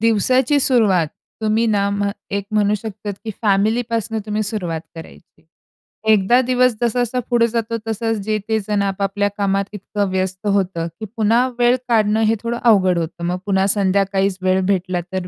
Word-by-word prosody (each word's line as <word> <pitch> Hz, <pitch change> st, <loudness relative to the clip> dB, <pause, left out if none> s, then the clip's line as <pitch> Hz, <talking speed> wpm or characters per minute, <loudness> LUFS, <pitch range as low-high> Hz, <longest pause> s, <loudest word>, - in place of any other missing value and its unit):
दिवसाची 255 Hz, +6 st, +3 dB
सुरुवात 205 Hz, -, +3 dB, 0.3 s
तुम्ही 220 Hz, +2 st, +1 dB
ना, 200 Hz, -2 st, +1 dB, 0.4 s
एक 200 Hz, 0 st, -2 dB
म्हणू 210 Hz, 0 st, +2 dB
शकतात 210 Hz, -1 st, -5 dB
की 220 Hz, -, -3 dB
फॅमिली 215 Hz, +4 st, +2 dB
पासनं 225 Hz, -1 st, -1 dB
तुम्ही 215 Hz, +1 st, -1 dB
सुरुवात 180 Hz, -7 st, -3 dB
करायची. 160 Hz, -1 st, -14 dB, 0.7 s
एकदा 215 Hz, +4 st, +4 dB
दिवस 250 Hz, -1 st, +3 dB
जसा-जसा 245 Hz, +1 st, 0 dB
पुढे 235 Hz, -1 st, +3 dB
जातो 230 Hz, 0 st, -2 dB
तसं 225 Hz, +1 st, -1 dB
जे 215 Hz, 0 st, 0 dB
ते 220 Hz, 0 st, +2 dB
जण 205 Hz, -1 st, +1 dB
आपापल्या 200 Hz, +1 st, -1 dB
कामात 195 Hz, -1 st, +1 dB
इतकं 205 Hz, 0 st, -3 dB
व्यस्त 185 Hz, +2 st, -2 dB
होतं 190 Hz, -4 st, 0 dB
की 220 Hz, -, -5 dB
पुन्हा 230 Hz, +4 st, +3 dB
वेळ 240 Hz, +1 st, +4 dB
काढणं 220 Hz, -1 st, +2 dB
हे 225 Hz, -, +3 dB
थोडं 235 Hz, 0 st, -2 dB
अवघड 190 Hz, -6 st, +4 dB
होतं 170 Hz, +1 st, -4 dB
मग 180 Hz, +1 st, -1 dB
पुन्हा 190 Hz, -1 st, +2 dB
संध्याकाळीच 195 Hz, -1 st, +1 dB
वेळ 185 Hz, 0 st, +2 dB
भेटला 185 Hz, -2 st, 0 dB
तर 185 Hz, -1 st, -3 dB
205 Hz, 160 wpm, -19 LUFS, 190-225 Hz, 0.7 s, एकदा